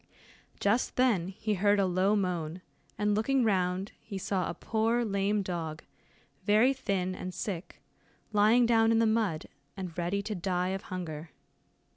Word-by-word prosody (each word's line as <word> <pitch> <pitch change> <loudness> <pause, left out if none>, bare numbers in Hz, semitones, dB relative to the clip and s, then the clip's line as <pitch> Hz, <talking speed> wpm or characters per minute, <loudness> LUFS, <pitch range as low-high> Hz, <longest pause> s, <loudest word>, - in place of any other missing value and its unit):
Just 210 +5 +1
then 230 -9 +2
he 210 +3 -2
heard 205 +1 +3
a 195 - +3
low 185 +3 +2
moan, 180 -3 -2 0.3
and 210 0 +1
looking 250 +5 +2
round, 190 -2 0
he 200 - -7
saw 190 -1 -1
a 170 - -4
poor 230 +2 0
lame 200 0 0
dog, 165 -4 -4 0.6
very 220 +6 +4
thin 190 -8 -1
and 185 0 -6
sick, 185 -4 -5 0.5
lying 215 +4 +5
down 225 -1 +4
in 225 - +4
the 230 - +4
mud, 220 -8 +1 0.3
and 180 -4 -6
ready 185 +4 -1
to 215 +1 -3
die 180 -1 -1
of 190 0 -2
hunger. 165 -3 -5
200 Hz, 155 wpm, -30 LUFS, 180-220 Hz, 0.6 s, lying